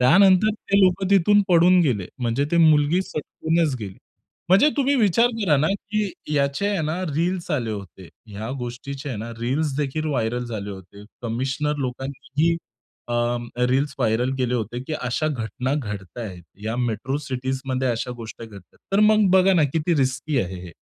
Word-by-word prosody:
त्यानंतर 190 +9 +6
ते 200 -2 0
लोकं 190 0 +3
तिथून 200 +2 +5
पळून 180 +1 +5
गेले. 115 - +1
म्हणजे 120 +3 0
ती 170 - +2
मुलगी 155 +1 +4
सटकूनच 160 -2 -1
गेली. 95 -3 -7 0.5
म्हणजे 195 +11 +6
तुम्ही 280 0 +2
विचार 225 +1 +4
करा 170 -8 +3
ना, 150 +3 +2 0.2
की 210 -2 0 0.2
याचे 140 +6 +1
आहे 200 -4 0
ना 155 +4 -2
रील्स 175 +2 -1
आले 125 -8 -1
होते. 95 -3 -8 0.2
ह्या 105 +3 -6
गोष्टीचे 135 +4 -6
आहे 120 - -4
ना 115 +2 -6
रील्सदेखील 145 +4 -1
व्हायरल 125 -4 -1
झाले 105 -4 -5
होते. 100 +1 -11 0.2
कमिशनर 130 +6 -1
लोकांनीही 135 +5 -2 0.5
अ, - - -3 0.6
रील्स 140 +2 +1
व्हायरल 120 +1 +1
केले 125 -1 0
होते, 120 0 -3
की 145 - -7
अशा 125 +3 -2
घटना 125 0 -2
घडताहेत. 105 -5 -6 0.2
या 110 +2 -2
मेट्रो 120 +2 -1
सिटीजमध्ये 130 -1 -2
अशा 120 +1 -2
गोष्टी 115 0 -8
घडतात. 100 -4 -15
तर 195 - +4
मग 215 -1 +5
बघा 190 +1 +5
ना 165 -4 +4
किती 165 +2 +1
रिस्की 135 +1 0
आहे 95 -3 -5
हे. 85 - -10
135 Hz, 160 wpm, -23 LUFS, 120-170 Hz, 0.6 s, त्यानंतर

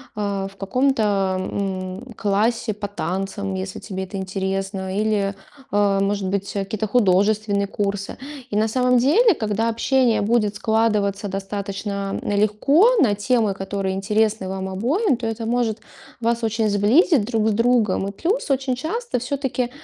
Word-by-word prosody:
э, 200 -2 -2
в - - -19
каком-то, 205 -5 +1
м, 190 +4 -4
классе 215 +2 +1
по 205 0 -5
танцам, 195 +1 -3
если 190 0 -5
тебе 190 -2 -5
это 190 +1 -6
интересно, 190 0 -3
или, 205 -2 0 0.4
э, 200 -1 +2
может 200 -1 0
быть, 200 +1 -2
э, - - 0
какие-то 215 +1 -3
художественные 205 -1 +2
курсы. 200 -1 -3 0.3
И 205 - 0
на 220 +1 +3
самом 250 +2 +2
деле, 365 - +5
когда 220 +1 -1
общение 240 0 +2
будет 210 -1 +1
складываться 210 -2 +1
достаточно 200 0 -4
легко 275 - +3
на 210 -9 +4
темы, 215 -1 +1
которые 195 0 -3
интересны 210 0 0
вам 190 0 -4
обоим, 260 - +1
то 235 -1 -6
это 225 0 -3
может 230 -2 0 0.4
вас 235 0 0
очень 220 -1 +1
сблизить 225 - +4
друг 220 -2 0
с - - +3
другом. 230 -4 +2
И - - -3
плюс 335 - -1
очень 265 -1 0
часто 365 - -3
всё-таки, 255 -1 -2
210 Hz, 150 wpm, -22 LUFS, 195-235 Hz, 0.4 s, деле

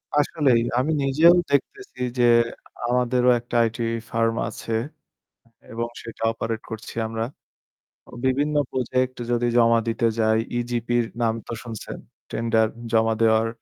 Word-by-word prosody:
আসলেই, 140 -5 +3 0.2
আমি 150 +5 0
নিজেও 155 +6 +6 0.2
দেখতেছি 395 - -2 0.2
যে, - - +4 0.6
আমাদেরও 125 0 +2
একটা 120 0 -8
IT 115 - -8 0.3
firm 115 0 +1
আছে 115 - -6 0.9
অ্যা - - -26
এবং 115 +1 -2 0.2
সেটা 115 -1 -10
operate 115 0 -4
করছি 110 0 -7
আমরা। 115 0 -3 0.9
ও - - -14
বিভিন্ন 145 +3 +1 0.2
project 130 0 -1 0.2
যদি 120 0 +1
জমা 115 0 +5
দিতে 115 +1 +1
যাই, 110 0 +3 0.2
EGP 120 -1 -3
র - - -4 0.2
নাম 115 -1 +2
তো - - -5
শুনছেন। 115 -3 -7 0.3
Tender 110 -1 +2 0.2
জমা 110 0 +3
দেওয়ার 110 0 +4
115 Hz, 135 wpm, -23 LUFS, 115-130 Hz, 0.9 s, নিজেও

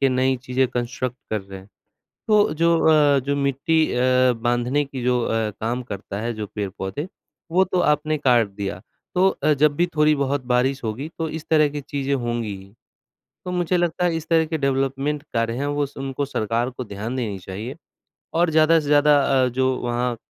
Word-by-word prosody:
के 135 - +4
नई 130 0 +1
चीज़ें 130 +1 +1
कंस्ट्रक्ट 120 +1 -3
कर 110 -1 0
रहे 95 0 -10
हैं, 95 +1 -15 0.6
तो 210 -1 +4
जो 170 +2 +3
अ, 145 -3 +5
जो 140 +2 -2
मिट्टी 140 +3 +1
अ, 125 0 +3
बाँधने 120 +4 0
की 135 -2 -7
जो 125 0 +2
अ, 115 -1 0
काम 120 +3 -1
करता 100 -3 -6
है 120 +1 -2
जो 110 -1 -5
पेड़-पौधे, 100 - -4 0.4
वो 185 +3 +4
तो 185 -1 -1
आपने 155 +1 -2
काट 120 -6 +3
दिया 100 -1 -5 0.3
तो 185 +1 +5
अ, 150 -4 +1
जब 145 +1 +2
भी 175 +3 +2
थोड़ी-बहुत 145 -3 +2
बारिश 130 +2 +1
होगी 115 +7 -4
तो 160 -1 -2
इस 160 0 -6
तरह 155 -2 +4
की 145 0 -5
चीज़ें 140 -1 -3
होंगी 120 -5 -2
ही। 95 +1 -15 0.7
तो 180 - -4
मुझे 180 0 0
लगता 175 0 0
है 170 -2 +1
इस 160 0 -6
तरह 165 -1 +4
के 160 0 -2
डेवलपमेंट 135 +1 -1
कार्य 115 0 0
हैं 140 - -1
वो 145 0 0
स 140 - -20
उनको 135 +1 -3
सरकार 115 -2 -1
को 130 0 -7
ध्यान 110 +4 -5
देनी 110 -6 -3
चाहिए 105 +9 -7 0.6
और 170 +1 +3
ज़्यादा 160 +1 +5
से 150 - -7
ज़्यादा 145 0 +5 0.3
अ, 125 - +2
जो 130 +1 0
वहाँ 120 0 -1
135 Hz, 195 wpm, -22 LUFS, 120-150 Hz, 0.7 s, अ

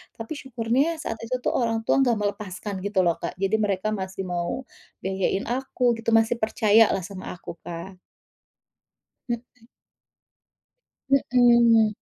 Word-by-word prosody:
tapi 225 +7 -6
syukurnya 265 +5 0
saat 225 - -4
itu 255 +2 -2
tuh - - +1
orang 230 -2 +1
tua - - +3
enggak 245 -3 +3
melepaskan 205 -1 -4
gitu 205 -2 +2
loh, 170 - +2
Kak. - - -4
Jadi 195 +2 +2
mereka 205 0 0
masih 190 -2 -4
mau 175 +8 -2 0.4
biayain 190 0 0
aku 260 0 -3
gitu, 225 0 -2
masih 225 +1 +3
percayalah 220 -2 +4
sama 190 +1 -8
aku, 170 - -9
Kak. 175 +2 -7 1.3
Mhm. 235 0 -6 1.6
Mhm. 235 -3 +5
220 Hz, 130 wpm, -25 LUFS, 190-235 Hz, 1.6 s, Mhm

